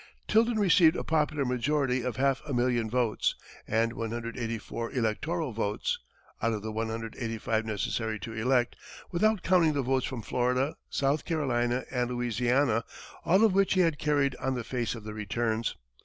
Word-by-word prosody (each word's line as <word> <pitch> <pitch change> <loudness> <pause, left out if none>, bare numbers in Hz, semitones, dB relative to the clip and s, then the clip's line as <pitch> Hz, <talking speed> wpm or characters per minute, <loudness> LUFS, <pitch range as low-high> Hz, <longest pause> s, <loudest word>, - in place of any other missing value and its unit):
Tilden 225 +1 +3
received 180 -5 +5
a - - -2
popular 150 -3 +1
majority 130 +1 +1
of 125 0 -3
half 135 0 +1
a 140 - -2
million 120 -2 +1
votes, 120 -2 +1 0.3
and 115 +1 +1
184 115 0 -4
electoral 135 +6 -1
votes, 105 -2 -1 0.4
out 115 0 +1
of 105 -1 -4
the 110 - -3
185 115 0 -2
necessary 110 +1 -2
to 115 - -6
elect, 120 +2 +1 0.4
without 215 +3 +2
counting 175 -4 +4
the 140 -2 0
votes 130 0 +1
from 125 -4 -5
Florida, 125 +5 0
South 140 +2 +1
Carolina 125 -6 0
and 125 -2 0
Louisiana, 120 0 +1 0.4
all 190 +5 +5
of 220 -4 +5
which 195 0 +3
he 185 - +5
had 165 -4 +2
carried 145 -3 +1
on 130 0 -1
the 125 - -3
face 120 0 -2
of 115 - -9
the 105 0 -6
returns. 110 +2 -1
125 Hz, 160 wpm, -29 LUFS, 115-145 Hz, 0.4 s, received